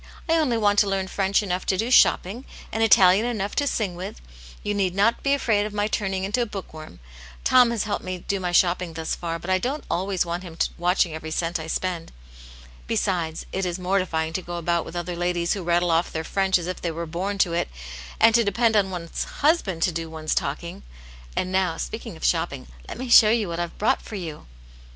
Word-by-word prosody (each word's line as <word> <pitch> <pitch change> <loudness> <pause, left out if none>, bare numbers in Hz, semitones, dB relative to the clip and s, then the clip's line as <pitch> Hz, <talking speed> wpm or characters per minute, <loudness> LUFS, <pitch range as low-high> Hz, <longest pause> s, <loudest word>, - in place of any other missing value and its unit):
I 325 - +2
only 270 -8 +1
want 205 -2 +3
to 205 - +3
learn 195 -1 -1
French 195 +1 +1
enough 185 -2 -2
to 190 - +2
do 230 +5 -1
shopping, 230 -1 +4 0.3
and 225 - -2
Italian 195 -2 +6
enough 205 -4 -2
to 285 - +2
sing 210 -8 -1
with; 175 - -7 0.4
you 205 - -1
need 190 -3 0
not 205 +4 +2
be 275 0 +2
afraid 210 -6 +1
of 210 - -9
my 205 0 +1
turning 195 -3 -2
into 210 +6 0
a 235 - 0
book 195 -5 -8
worm. 155 - -11 0.4
Tom 250 -2 +6
has 235 -3 -1
helped 210 -1 -3
me 185 0 -4
do 195 +2 -3
my 180 -1 -2
shopping 175 -1 +2
thus 160 0 -3
far, 165 -1 -3
but 175 +3 -5
I 185 - +3
don't 270 +8 -3
always 185 +1 0
want 170 +1 -3
him 170 -3 -10 0.2
watching 175 -1 +1
every 160 0 -6
cent 165 +2 -1
I 160 - -6
spend. 170 0 -3 0.8
Besides, 180 -7 -1
it 190 - -2
is 175 -1 -2
mor 185 +2 +1
tifying 160 -3 -2
to 185 - -2
go 175 0 -6
about 170 0 0
with - - -9
other 175 0 -3
ladies 175 0 0
who 200 - -4
rattle 175 0 +1
off 165 +1 +1
their 160 - -3
French 190 +3 +2
as 175 - -5
if 185 0 -5
they 170 - -1
were 165 +1 -4
born 185 +5 -3
to 180 -4 +2
it, 170 - -1 0.5
and 225 - +6
to 235 0 +5
depend 225 +2 +2
on 200 -2 +3
one's 175 -3 -4
husband 250 - +1
to 180 - +2
do 165 0 -4
one's 155 -1 -3
talking. 150 - -3 0.5
And 185 - -1
now, 185 -3 +1
speaking - - -6
of - - -5
shopping, - - 0 0.2
let - - -6
me 255 +1 -5
show 225 -2 +8
you 220 -2 +2
what 170 0 -4
I've 175 -1 -4
brought 215 - +1
for 215 - -9
you." 165 - -7
185 Hz, 230 wpm, -24 LUFS, 170-205 Hz, 0.8 s, show